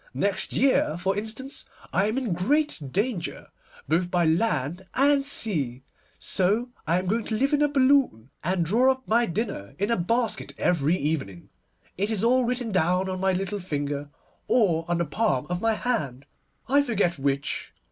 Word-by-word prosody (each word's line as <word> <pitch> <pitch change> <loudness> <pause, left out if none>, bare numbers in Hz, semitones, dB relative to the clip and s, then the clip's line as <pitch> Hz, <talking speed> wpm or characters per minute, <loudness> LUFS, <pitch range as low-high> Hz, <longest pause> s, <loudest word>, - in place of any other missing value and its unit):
Next 200 -1 0
year, 255 - +2
for 190 +2 0
instance, 220 +6 -4 0.3
I 195 - +3
am 220 +4 -1
in 245 -8 -1
great 290 - +1
danger, 205 - -2 0.4
both 170 +4 +1
by 175 -1 +2
land 165 - 0
and 280 +1 +4
sea, 150 - 0 0.3
so 210 +7 0 0.2
I 170 +2 +3
am 185 - -2
going 220 +5 0
to 220 - -2
live 275 +5 +1
in 295 - +3
a 295 - +5
balloon, 270 - +2
and 175 0 0
draw 240 +10 +4
up 260 0 -6
my 235 +2 +3
dinner 170 - -4
in 200 +3 0
a 230 - +2
basket 230 +7 -1
every 165 0 +2
evening. 135 - -3 0.5
It 200 +2 0
is 215 -2 -1
all 250 +2 +4
written 245 -1 -2
down 180 +1 +1
on 185 0 -3
my 190 0 +2
little 195 +2 -2
finger, 145 -4 -3 0.4
or 175 -9 +2
on 175 0 0
the 170 - 0
palm 150 - 0
of 180 +1 -2
my 225 -1 +2
hand, 140 - -2 0.4
I 280 +2 +4
forget 205 - 0
which. 140 +1 -2
190 Hz, 175 wpm, -26 LUFS, 165-240 Hz, 0.5 s, a